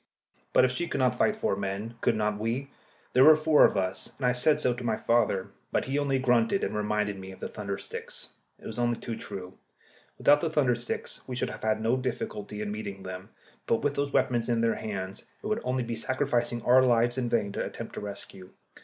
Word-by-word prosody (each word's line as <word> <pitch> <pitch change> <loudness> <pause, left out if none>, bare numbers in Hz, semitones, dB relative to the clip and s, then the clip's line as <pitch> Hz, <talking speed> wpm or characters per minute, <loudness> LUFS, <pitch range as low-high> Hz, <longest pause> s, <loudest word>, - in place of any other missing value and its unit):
] - - -40
But - - +6
if 130 - +1
she 175 +7 -2
could - - -3
not 125 -2 +3
fight 210 - +2
four 215 - 0
men, 100 +3 -4
could - - +2
not 105 -1 0
we? 120 +6 -2 0.4
There 130 - +6
were 155 +2 +9
four 155 -1 +5
of - - +2
us, 95 -1 -2
and 135 - -2
I 125 - +4
said 125 +5 +3
so 125 - +2
to 120 +1 -7
my 115 -2 0
father. 110 -5 +1 0.2
But - - +1
he 135 +2 0
only 140 -2 +1
grunted, 125 - +2
and - - -1
reminded 105 -1 -1
me 95 0 -8
of 95 - -12
the - - -4
thunder 100 -2 -4
sticks. - - -8 0.3
It - - -17
was - - -5
only 120 -1 +1
too 115 - -5
true. 95 -4 -8 0.6
Without 145 +1 +5
the 165 - 0
thunder 145 -6 +3
sticks 120 0 -5
we 130 - -4
should - - -1
have - - -9
had 110 0 0
no 115 +3 +2
difficulty 105 -5 -4
in 105 - -3
meeting 100 -2 -6
them, 95 0 -7 0.4
but 115 - +1
with 145 -1 +1
those 140 0 -1
weapons 120 -3 +1
in 115 -1 +2
their 115 0 +3
hands 100 -3 -5 0.2
it - - -9
would 215 +2 0
only 125 0 0
be 120 0 -3
sacrificing 120 -1 -1
our 125 +2 +6
lives 120 0 +3
in 120 -2 -1
vain 105 -4 +1
to - - -2
attempt - - -7
a - - -4
rescue. 100 -2 -7
120 Hz, 235 wpm, -28 LUFS, 105-130 Hz, 0.6 s, were